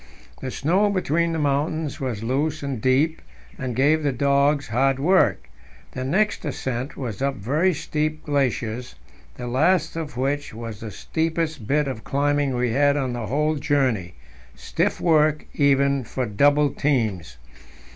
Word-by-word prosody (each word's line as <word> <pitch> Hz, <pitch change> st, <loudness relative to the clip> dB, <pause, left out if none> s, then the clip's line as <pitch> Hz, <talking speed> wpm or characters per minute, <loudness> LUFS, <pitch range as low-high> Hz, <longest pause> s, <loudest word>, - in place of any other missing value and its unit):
The 130 Hz, -, -4 dB
snow 180 Hz, +11 st, +1 dB
between 170 Hz, -3 st, 0 dB
the 165 Hz, -, -2 dB
mountains 150 Hz, +1 st, -1 dB
was 120 Hz, -5 st, -3 dB
loose 145 Hz, +5 st, -1 dB
and 135 Hz, -5 st, -3 dB
deep, 140 Hz, +6 st, +2 dB, 0.4 s
and 125 Hz, -2 st, -3 dB
gave 150 Hz, +5 st, +3 dB
the 145 Hz, -2 st, +1 dB
dogs 140 Hz, +2 st, +2 dB
hard 135 Hz, +4 st, +2 dB
work. 180 Hz, +7 st, +2 dB, 0.4 s
The 130 Hz, -, -5 dB
next 195 Hz, +11 st, +1 dB
ascent 130 Hz, -2 st, -4 dB
was 120 Hz, -6 st, -5 dB
up 140 Hz, 0 st, 0 dB
very 145 Hz, -, +1 dB
steep 155 Hz, +1 st, -2 dB
glaciers, 125 Hz, -4 st, -1 dB, 0.4 s
the 125 Hz, -, -6 dB
last 160 Hz, +7 st, +2 dB
of 155 Hz, -6 st, -5 dB
which 140 Hz, -1 st, -2 dB
was 115 Hz, -2 st, -7 dB
the 110 Hz, -, -6 dB
steepest 160 Hz, -, -2 dB
bit 150 Hz, +1 st, +2 dB
of 120 Hz, -5 st, -5 dB
climbing 145 Hz, -1 st, 0 dB
we 125 Hz, -1 st, 0 dB
had 145 Hz, +3 st, +3 dB
on 130 Hz, -3 st, -1 dB
the 120 Hz, -3 st, -4 dB
whole 150 Hz, +3 st, 0 dB
journey 135 Hz, -, 0 dB, 0.4 s
stiff 70 Hz, -, -1 dB
work 155 Hz, -2 st, +3 dB
even 140 Hz, -1 st, +2 dB
for 130 Hz, +2 st, -3 dB
double 145 Hz, +7 st, +3 dB
teams. 110 Hz, -, -1 dB
140 Hz, 150 wpm, -23 LUFS, 125-150 Hz, 0.4 s, gave